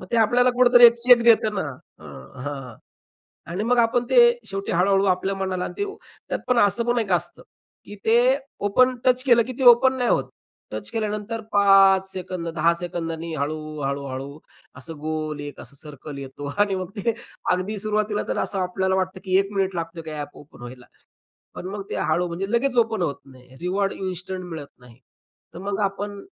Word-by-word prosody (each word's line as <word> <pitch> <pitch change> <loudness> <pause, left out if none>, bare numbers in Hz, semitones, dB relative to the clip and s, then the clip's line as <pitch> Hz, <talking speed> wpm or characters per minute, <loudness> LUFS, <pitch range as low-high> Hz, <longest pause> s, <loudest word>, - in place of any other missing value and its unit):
मग 185 - -10
ते - - +2
आपल्याला 245 +3 +4
कुठेतरी 245 -1 +6
1 235 - +5
चेक 245 0 +6
देत 230 -2 +5
ना? - - -1 0.4
अ - - -16 0.4
हां 135 -5 -6 0.8
आणि 195 +5 -2
मग 245 +1 +1
आपण 235 +1 +2
ते 260 - +2 0.3
शेवटी 195 0 -4
हळू-हळू 195 +3 +3
आपल्या 190 +1 0
मनाला 190 -1 -2
अन् - - -6
ते 405 - -1 0.4
त्यात - - -2
पण 250 -1 +2
असं 205 +3 +4
पण 240 0 +1
एक 200 -4 -3
असतं, 260 - -2 0.4
की 205 - -10
ते 225 +1 +4 0.5
ओपन 255 +5 +3
टच 255 0 +3
केलं 235 -3 +5
की 255 - -5
ते - - 0
ओपन 260 +2 +3
नाही 245 -2 0
होत. - - +1 0.4
टच - - -5
केल्यानंतर 215 0 -3
5 195 -1 +5
सेकंद 180 -2 -5
10 170 +2 +3
सेकंदांनी 165 -2 -4
हळू, 150 +2 -2 0.3
हळू-हळू 140 +1 -5 0.4
असं 160 +5 -8
गोल 155 -1 -4
एक 145 0 -8
असं - - -14
सर्कल 145 0 -10
येतो 140 +1 -8
आणि 205 -1 +2
मग 185 -1 -4
ते 225 +3 0 0.4
अगदी 185 +4 -1
सुरुवातीला 215 0 -1
तर - - -2
असं 195 - -2
आपल्याला 190 +1 0
वाटतं 185 0 -2
की 185 0 +2
1 195 +1 -2
मिनिट 195 -1 -1
लागतो 165 0 -5
की 160 -1 -8
ॲप 145 -1 -7
ओपन 145 -4 -16
व्हायला. 125 0 -10 0.7
पण 180 - -6
मग 200 0 -5
ते - - -4
हळू 175 +1 +1
म्हणजे 190 +5 -4
लगेच 250 +1 +1
ओपन 225 -4 +2
होत 145 -5 -2
नाही. 130 -1 -17
रिवॉर्ड 195 +2 -1
इन्स्टंट 185 0 -5
मिळत 160 -5 -7
नाही. 125 0 -18 0.5
तर 170 - -9
मग 200 +1 -3
आपण 200 0 -3
190 Hz, 190 wpm, -23 LUFS, 165-220 Hz, 0.8 s, कुठेतरी